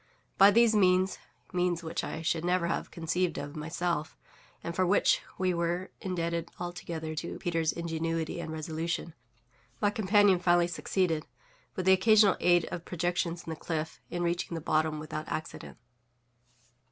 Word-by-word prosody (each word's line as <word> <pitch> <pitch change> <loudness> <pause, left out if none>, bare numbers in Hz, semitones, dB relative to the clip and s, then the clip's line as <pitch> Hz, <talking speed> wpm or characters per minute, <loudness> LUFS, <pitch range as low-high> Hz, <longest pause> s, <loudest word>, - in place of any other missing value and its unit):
By 195 +1 +9
these 230 +1 +5
means 185 -1 +3 0.3
(means 175 -1 0
which 160 - -3
I 160 - -5
should 160 0 0
never 180 0 +1
have 170 - -2
conceived 170 +1 -1
of 145 +2 -6
myself, 160 0 -2 0.5
and 170 - -4
for 185 - +2
which 185 +3 +3 0.2
we 185 -1 +1
were 170 +2 -1
indebted 170 -2 -2
altogether 170 -2 -5
to 165 +2 -5
Peters' 165 -3 0
ingenuity 165 -1 -3
and 160 - -5
resolution) 160 +1 -3 0.7
my 205 -1 +2
companion 205 -2 +4
finally 175 -1 +4
succeeded, 175 -2 -1 0.5
with 185 - -3
the 190 - +7
occasional 210 +1 +5
aid 175 -1 +4
of 170 - -5
projections 175 -1 -2
in 165 - -6
the - - -3
cliff, 160 0 -4
in 175 0 -2
reaching 170 0 -1
the - - -2
bottom 155 0 +1
without 155 0 -5
accident. 155 - -6
170 Hz, 150 wpm, -30 LUFS, 160-180 Hz, 0.7 s, By